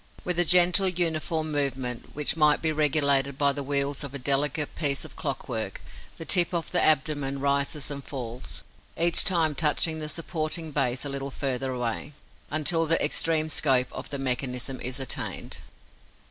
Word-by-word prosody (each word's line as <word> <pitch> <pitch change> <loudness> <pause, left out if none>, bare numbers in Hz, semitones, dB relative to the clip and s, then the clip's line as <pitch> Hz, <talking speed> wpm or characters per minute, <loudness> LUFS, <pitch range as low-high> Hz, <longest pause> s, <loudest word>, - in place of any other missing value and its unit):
With 180 -1 -1
a 175 - +4
gentle, 180 +2 +6
uniform 160 -3 -1
movement, 130 -4 -3
which 150 +1 0
might 150 -2 +4
be 160 - 0
regulated 140 -2 +2
by 140 -1 +3
the 145 - -4
wheels 140 0 0
of 140 -1 -7
a - - -1
delicate 140 +2 0
piece 140 -4 0
of - - -13
clockwork, - - -4 0.4
the 165 - -8
tip 175 0 +5
of 170 - -3
the 180 - +2
abdomen 140 -2 +1
rises 140 +1 -1
and 140 -1 -6
falls, 125 -4 -6 0.3
each 170 +1 +6
time 165 -5 +2
touching 160 +2 +1
the 155 -1 -5
supporting 160 -1 -4
base 130 -2 -1
a - - -3
little 140 0 -4
farther 135 -1 -3
away, 125 +3 -4 0.4
until 160 +2 0
the 165 - +3
extreme 155 +1 +1
scope 130 -5 +2
of - - -7
the 140 - -4
mechanism 130 -1 -2
is 125 +2 -3
attained. 130 -3 -4
145 Hz, 165 wpm, -26 LUFS, 135-160 Hz, 0.4 s, gentle